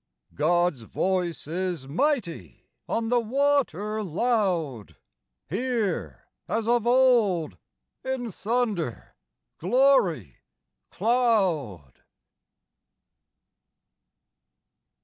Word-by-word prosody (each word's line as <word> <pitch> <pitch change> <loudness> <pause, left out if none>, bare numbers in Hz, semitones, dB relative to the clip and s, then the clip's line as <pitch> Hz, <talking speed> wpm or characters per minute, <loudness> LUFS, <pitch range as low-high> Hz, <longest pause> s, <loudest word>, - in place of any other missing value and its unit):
God's 175 -2 +1
voice 180 - -2
is 170 -3 -3
mighty, 170 - -2 0.2
on 225 0 -1
the 245 0 +3
water 230 - 0
loud, 180 - -1 0.5
Here, 225 - -2 0.2
as 225 0 -2
of 240 -1 +2
old, 240 -10 +3 0.5
in 260 -3 -3
thunder, 205 - -2 0.5
glory, 195 - +2 0.5
cloud! 185 - 0
200 Hz, 65 wpm, -26 LUFS, 165-240 Hz, 0.5 s, the